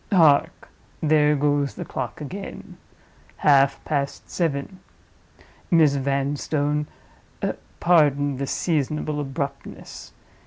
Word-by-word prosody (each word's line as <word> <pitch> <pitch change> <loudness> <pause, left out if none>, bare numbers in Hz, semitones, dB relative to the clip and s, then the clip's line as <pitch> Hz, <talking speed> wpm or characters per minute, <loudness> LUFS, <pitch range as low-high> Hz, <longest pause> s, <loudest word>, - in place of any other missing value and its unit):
Hark! 160 -7 +4 0.3
there 150 -1 +3
goes 145 -1 +1
the - - -6
clock - - -5
again—half 140 -4 -2
past 140 -2 -3
seven. 165 +2 -2 0.9
Miss 160 -4 +5
Vanstone, 145 +2 -1 0.9
pardon 145 -5 +3
this 135 0 -3
seasonable 150 -2 -1
abruptness! 140 0 -6
145 Hz, 80 wpm, -23 LUFS, 140-155 Hz, 0.9 s, Miss